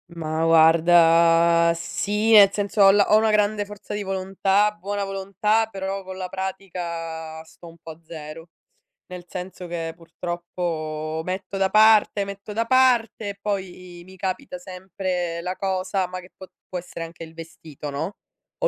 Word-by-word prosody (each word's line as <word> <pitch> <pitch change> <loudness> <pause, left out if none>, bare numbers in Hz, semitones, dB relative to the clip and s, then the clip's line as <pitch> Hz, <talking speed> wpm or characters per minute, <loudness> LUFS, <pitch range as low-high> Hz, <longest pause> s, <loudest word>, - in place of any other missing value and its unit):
Ma 160 0 -2
guarda, 165 +1 +5
sì 210 +6 -1
e 205 -2 +9
senso, 205 0 -1
ho 195 0 +7
ho 205 +1 +5
una 220 0 +3
grande 210 0 +1
forza 205 0 -9
di 205 0 -3
volontà, 195 +2 +1
buona 205 0 -4
volontà, 200 +3 0
però 195 -2 -4
con 190 0 -7
la 185 -1 -5
pratica 170 -4 -5
sto 170 +1 -16
un 165 0 -14
po' 165 0 -10
a 155 - -13
0. 160 0 -9 0.6
Nel 180 -1 -9
senso 180 0 -7
che, 165 -1 -4
purtroppo 165 -2 -4
metto 190 +1 -4
da 190 0 +2
parte, 215 -1 +5
metto 200 +1 -8
da 225 +2 0
parte 240 -4 +2
e 200 - -13
poi 185 -3 -5
mi 190 +1 -14
capita 185 -1 -4
sempre 180 -2 -4
la 180 +2 -4
cosa, 190 0 -1
ma 185 0 -6
che 180 - -16
può 190 - -11 0.2
può 180 - -3
essere 170 -1 -8
anche 165 0 -11
il 160 0 -11
vestito 160 -3 -9
no, 160 +8 -4 0.4
o - - +2
185 Hz, 160 wpm, -23 LUFS, 165-200 Hz, 0.6 s, e